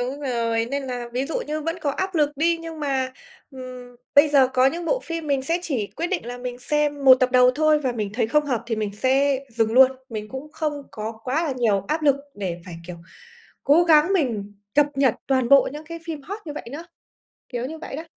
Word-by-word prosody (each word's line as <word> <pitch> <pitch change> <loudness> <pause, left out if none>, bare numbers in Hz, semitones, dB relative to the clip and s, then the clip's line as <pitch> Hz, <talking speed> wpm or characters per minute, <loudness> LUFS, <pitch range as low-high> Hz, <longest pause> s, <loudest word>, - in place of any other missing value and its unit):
Đúng 260 +4 -3
rồi, 230 -4 -1
nên 280 0 -2
là 245 -2 -4
ví 255 +2 -1
dụ 320 - -2
như 305 +1 -3
vẫn 330 +3 -3
có 285 - 0
áp 380 +5 -3
lực 295 -2 +2
đi, 335 +3 +2
nhưng 330 -1 -8
mà, 265 -3 -1 0.4
ừm, 255 -2 -10 0.2
bây 290 +2 +7
giờ 275 -3 +5
có 260 0 +3
những 335 +5 -1
bộ - - 0
phim 330 -2 -5
mình 275 -2 +1
sẽ 330 +5 0
chỉ 255 - -2
quyết 335 - -1
định 355 -9 -3
là 245 0 -6
mình 245 0 -6
xem 290 +1 -1
một 260 - +10
tập 255 - +3
đầu 250 0 +6
thôi 310 0 +3
và 260 -4 -1
mình 210 -4 -3
thấy 230 -1 +1
không 300 +6 +2
hợp 245 -5 -1
thì 225 -2 -2
mình 210 -2 -2
sẽ 265 +4 +2
dừng 225 -1 0
luôn. 260 +2 +7 0.2
Mình 215 -2 -6
cũng 275 +3 -8
không 300 -3 -3
có 220 +1 -5
quá 290 +6 0
là 300 - -1
nhiều 205 -5 +1
áp 310 +1 -1
lực 285 -2 +4 0.2
để 180 -4 -4
phải, 175 -3 -9
kiểu, 180 -1 -7 0.7
cố 330 +5 +5
gắng 320 +3 +5
mình 230 - -1 0.2
cập 295 0 +5
nhật 270 -4 +3
toàn 260 -3 +1
bộ 280 0 +6
những 300 +2 -8
cái 335 +1 -7
phim 315 -4 -6
hot 400 +8 -6
như 300 - -5
vậy 295 - -8
nữa, 325 +4 -7 0.6
kiểu 245 0 -3
như 320 +4 -7
vậy 310 - -7
đó. 315 - -5
270 Hz, 240 wpm, -23 LUFS, 245-305 Hz, 0.7 s, một